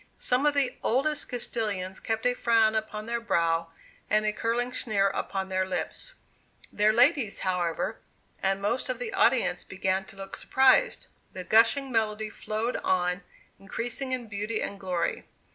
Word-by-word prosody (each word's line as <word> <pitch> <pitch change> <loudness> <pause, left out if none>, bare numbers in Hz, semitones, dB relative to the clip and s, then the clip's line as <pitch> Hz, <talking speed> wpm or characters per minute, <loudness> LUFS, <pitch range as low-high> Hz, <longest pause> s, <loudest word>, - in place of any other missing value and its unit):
Some 255 +4 +1
of 295 - +2
the 275 -3 +1
oldest 290 +5 0
Castilians 210 -6 -3
kept 225 +1 -2
a 250 - +4
frown 225 -3 +3
upon 215 -1 -3
their 235 +1 -2
brow 165 -6 +1 0.4
and 215 +1 +3
a 210 - +1
curling 240 +3 -1
sneer 200 -6 +1
upon 195 -1 -3
their 185 0 0
lip; 185 0 -2 0.8
their 210 +1 +4
ladies, 245 -1 +3
however, 180 -3 -1 0.4
and 195 0 +1
most 235 +6 -1
of 255 - -1
the 240 -2 -5
audience 230 -8 +2
began 190 0 -1
to 195 - -14
look 195 0 -7
surprised. 265 - +3 0.3
The 185 - -6
gushing 260 +7 +4
melody 215 -2 0
flowed 220 +3 -3
on 180 0 0 0.4
increasing 235 +6 -3
in 250 -2 -2
beauty 210 +1 -3
and 200 - -4
glory. 180 -3 -2
215 Hz, 155 wpm, -28 LUFS, 195-245 Hz, 0.8 s, a